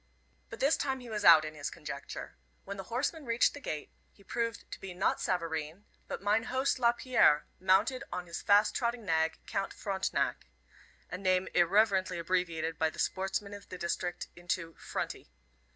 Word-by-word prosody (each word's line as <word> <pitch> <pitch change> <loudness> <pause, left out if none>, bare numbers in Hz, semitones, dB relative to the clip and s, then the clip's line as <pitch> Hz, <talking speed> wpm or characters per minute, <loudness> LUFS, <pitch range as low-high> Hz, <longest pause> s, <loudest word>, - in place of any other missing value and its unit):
But - - -8
this 280 +4 +3
time 265 -2 -1
he 245 -2 -10
was 210 -1 -2
out 160 -4 +9
in 155 - -6
his 145 -2 -4
conjecture. - - -7 0.3
When 200 - -5
the 195 - -6
horseman 275 - -2
reached 235 -2 +3
the 285 - -8
gate, 155 - -5 0.2
he 200 - -21
proved 230 +1 -2
to - - -6
be 190 -2 -7
not 190 - +1
Savareen, 165 0 -2 0.2
but - - -5
mine 210 +2 +2
host 260 +1 0
Lapierre, 235 - +4
mounted 200 +8 +3
on 180 - -4
his 170 - -6
fast 205 +1 +5
trotting 235 -2 -1
nag, 160 -2 +1
Count 195 0 -2
Frontenac 195 -2 -1 0.6
a 180 - -4
name 185 -1 +2
irreverently 190 +1 +3
abbreviated 170 -2 -1
by 160 - +3
the - - -13
sportsmen 195 +2 -1
of 205 0 -10
the 185 - -6
district 175 0 -3
into 175 -1 -3
"Fronty." - - -5
190 Hz, 170 wpm, -31 LUFS, 170-230 Hz, 0.6 s, out